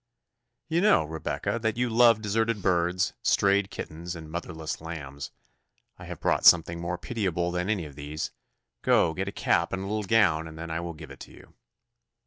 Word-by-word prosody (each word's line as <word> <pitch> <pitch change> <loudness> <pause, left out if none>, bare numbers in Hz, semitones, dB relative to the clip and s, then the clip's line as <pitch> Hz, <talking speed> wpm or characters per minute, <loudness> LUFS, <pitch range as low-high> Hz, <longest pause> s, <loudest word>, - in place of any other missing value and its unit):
"You 165 +2 +1
know, 205 - +5
Rebecca, 80 +8 -3
that 110 0 -1
you 125 0 +1
love 115 -1 +5
deserted 110 0 0
birds, 90 +1 +1
strayed 100 0 +3
kittens, 85 +3 -6
and 80 -2 -9
motherless 80 -2 -5
lambs. 70 -4 -7 0.7
I - - -9
have - - -7
brought - - +1
something 85 0 +6
more 85 +1 -3
pitiable 90 -7 -2
than 90 +2 -2
any 100 -6 0
of 75 - -10
these. 75 +2 -5 0.5
Go, 80 - +3
get 95 +2 -3
a - - -2
cap 85 -3 +1
and 95 0 -3
a - - -5
little 105 +2 -2
gown, 95 -7 +3
and 80 0 -10
then 85 0 -6
I 80 - -1
will 85 -1 -5
give 75 -2 -11
it 70 - -10
you." - - -17
85 Hz, 185 wpm, -27 LUFS, 80-105 Hz, 0.7 s, something